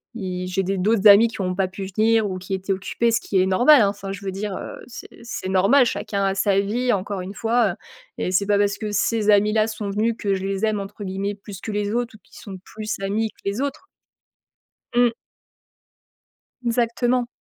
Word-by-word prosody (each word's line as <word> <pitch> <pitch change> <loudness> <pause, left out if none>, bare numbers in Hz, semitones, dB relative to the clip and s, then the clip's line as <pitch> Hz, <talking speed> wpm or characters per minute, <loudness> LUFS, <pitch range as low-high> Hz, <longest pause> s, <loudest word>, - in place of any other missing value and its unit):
i 180 -4 -4
j'ai 185 +1 -1
des 195 +1 -1
d'autres 210 +2 +3
amis 205 +3 +8
qui 225 - -6
ont 185 -1 -1
pas 190 0 +1
pu 190 +1 -7
venir 220 +2 +2
ou 185 - -4
qui 185 +2 -6
étaient 190 +1 -2
occupés, 200 +5 -1
ce 225 - +2
qui 195 - 0
est 185 - +2
normal, 245 +9 +6
hein. 200 - +4
Enfin, 200 -1 -6
je 200 0 -7
veux 190 - -2
dire, 195 +1 -4
heu, - - -7
c'est 245 - -10 0.2
c'est 230 -5 -5
normal. 200 +8 +4
Chacun 200 -3 -2
a 195 0 +1
sa 195 0 +2
vie, 240 +5 0
encore 195 -1 -3
une 185 +2 -7
fois 225 -4 +1 0.4
et - - -1
c'est 185 +2 +2
pas 205 0 +2
parce 205 0 +1
que 210 0 -4
ces 210 +2 +1
amis 210 +1 +4
là 215 0 +2
sont 215 -2 -5
venus 220 +3 0
que 200 -3 0
je 190 - -5
les 195 +2 -1
aime, 215 -1 0
entre 200 +1 -7
guillemets, 195 +1 -3
«plus 200 -1 -10
que 220 - -5
les 205 0 -1
autres» 240 -1 -2
ou - - -16
qui - - -18
sont 195 -3 -9
plus 215 +2 -6
amis 210 +3 -1
que - - -34
les 200 +3 -2
autres. 285 +6 -4 1.1
Mmh. 240 -1 +4 1.5
Exactement. 240 +1 +1
205 Hz, 220 wpm, -22 LUFS, 195-225 Hz, 1.5 s, amis